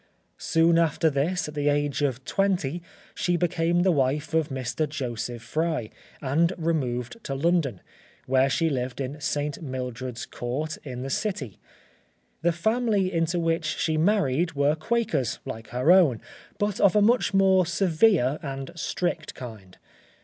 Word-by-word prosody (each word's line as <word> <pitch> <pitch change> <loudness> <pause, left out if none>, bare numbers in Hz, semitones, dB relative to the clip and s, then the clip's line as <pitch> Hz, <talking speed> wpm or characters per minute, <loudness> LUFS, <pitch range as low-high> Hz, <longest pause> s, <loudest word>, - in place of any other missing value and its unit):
Soon 165 +1 +3
after 160 -1 +2
this, 155 +6 0
at 150 - -7
the 145 -1 +1
age 145 0 0
of 130 -3 -1
twenty, 180 -5 0 0.3
she 175 -1 0
became 175 0 +1
the 190 - +4
wife 145 +1 0
of 160 -1 +2
Mr. 130 +3 -2
Joseph 120 -4 -4
Fry, 155 -6 -2 0.3
and 165 +6 +2
removed 150 - -2
to 135 - -3
London, 145 - +1 0.4
where 130 +1 +3
she 165 +4 +1
lived 130 -4 -2
in 140 +3 -4
St. 145 +1 -2
Mildred's 130 -2 -5
Court, 140 +6 -4
in 125 -3 -6
the 135 - -4
City. 140 - -3 0.8
The 170 +1 +3
family 210 +1 +1
into 165 +1 +1
which 165 0 0
she 160 - 0
married 160 -3 +2
were 145 +1 +2
Quakers, 160 - -1
like 110 0 -7
her 125 +8 +2
own, 165 -11 +5 0.4
but 205 -1 -1
of 200 -1 +4
a 210 - +5
much 230 -2 +3
more 190 -2 +4
severe 170 - +3
and 135 -1 -5
strict 175 +1 -3
kind. 110 -7 -10
155 Hz, 150 wpm, -26 LUFS, 130-175 Hz, 0.8 s, own